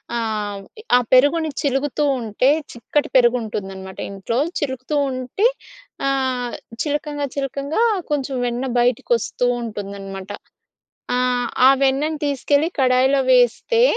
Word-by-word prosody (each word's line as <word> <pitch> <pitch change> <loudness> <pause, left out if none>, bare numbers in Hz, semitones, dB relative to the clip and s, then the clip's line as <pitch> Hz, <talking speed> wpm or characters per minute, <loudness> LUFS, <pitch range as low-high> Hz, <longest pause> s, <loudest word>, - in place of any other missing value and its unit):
ఆహ్, 210 -3 -2 0.4
ఆ - - +4
పెరుగుని 305 +5 +4
చిలుకుతూ 280 +1 0 0.2
ఉంటే 230 +4 +1 0.2
చిక్కటి 265 +5 -1
పెరుగు 250 -1 +5
ఉంటుందనమాట 190 -3 -6
ఇంట్లో. 200 +5 -3 0.2
చిలుకుతూ 260 +1 -3 0.2
ఉంటే 255 - -2 0.6
ఆహ్, 260 -3 -1 0.3
చిలకంగా 295 -1 -2
చిలకంగా 280 - -2 0.3
కొంచెం 275 -2 -1
వెన్న 245 +2 -2
బయటకి 245 0 +1
వస్తూంటుందనమాట. 205 -5 -4 0.9
ఆహ్, 250 -1 +1 0.2
ఆ - - +8
వెన్నను 290 +3 +1
తీసుకెళ్ళి 285 +3 +1
కడాయిలో 260 +2 +3
వేస్తే, 250 - +3
255 Hz, 105 wpm, -21 LUFS, 230-285 Hz, 0.9 s, ఆ